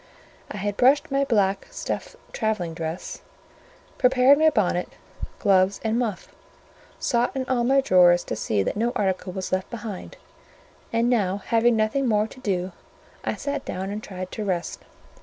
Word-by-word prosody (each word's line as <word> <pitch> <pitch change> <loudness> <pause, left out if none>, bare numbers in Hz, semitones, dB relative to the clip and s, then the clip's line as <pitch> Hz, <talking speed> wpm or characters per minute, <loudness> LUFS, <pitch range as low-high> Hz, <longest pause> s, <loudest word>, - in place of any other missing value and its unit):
I - - -6
had 205 +1 -3
brushed 270 +3 +4
my 275 0 +2
black 200 -6 +1
stuff - - -5 0.2
travelling 215 -7 -1
dress, 160 +1 -5 0.8
prepared 260 +2 +5
my 315 0 +6
bonnet, 180 - 0 0.5
gloves, 195 -1 +3
and 225 +1 0
muff; 225 -6 -3 0.6
sought 240 +1 0
in 265 -1 -2
all 250 -2 +1
my 270 +3 +4
drawers 175 -6 +5
to - - -4
see 105 -2 0
that - - -2
no 235 +3 0
article 190 -1 -1
was 185 0 -5
left 185 0 -1
behind; 230 - -7 0.7
and 230 +1 +1
now 200 -6 +1
having 230 +3 +2
nothing 220 +5 +1
more 210 -2 +2
to 240 - -12
do, 185 -5 -2 0.5
I - - -1
sat 285 0 -4
down 190 +2 -4
and 210 +1 -4
tried 185 -3 -7
to 215 - -4
rest. 180 -4 -2
210 Hz, 160 wpm, -24 LUFS, 185-245 Hz, 0.8 s, my